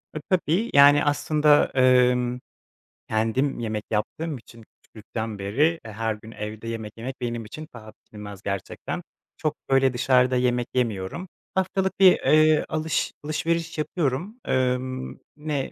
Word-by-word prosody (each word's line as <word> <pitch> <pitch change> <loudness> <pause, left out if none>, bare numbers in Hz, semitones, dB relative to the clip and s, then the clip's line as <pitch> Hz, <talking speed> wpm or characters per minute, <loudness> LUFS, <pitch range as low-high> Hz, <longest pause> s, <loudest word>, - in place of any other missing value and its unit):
Iıı, 155 - -4
tabii. 185 +4 +1
Yani, 145 +1 +7
aslında, 150 0 +3
ımm, 125 -1 +3 0.7
kendim 115 +5 0
yemek 110 -2 -3
yaptığım 145 +8 -2
için 115 -1 -15
küçüklükten 110 0 -7
beri, 145 +12 +1
her 110 +1 -2
gün 110 +1 -12
evde 110 +1 -7
yemek 110 -2 -5
yemek 125 +3 -7
benim 120 -2 -3
için 155 +8 -9
paha 110 -2 -11
biçilmez 105 -3 -11
gerçekten. 100 -1 -4 0.3
Çok 155 -1 -1
böyle 135 -1 +4
dışarıda 125 +1 +3
yemek 125 -1 +1
yemiyorum. 115 - -2 0.3
Haftalık 190 0 0
bir 190 -1 +9
eee 155 0 +4
alış 155 0 -1
alışveriş 165 +2 -2
yapıyorum. 165 - -2
Imm, 130 0 -1 0.2
ne 150 -3 -3
130 Hz, 130 wpm, -24 LUFS, 115-155 Hz, 0.7 s, bir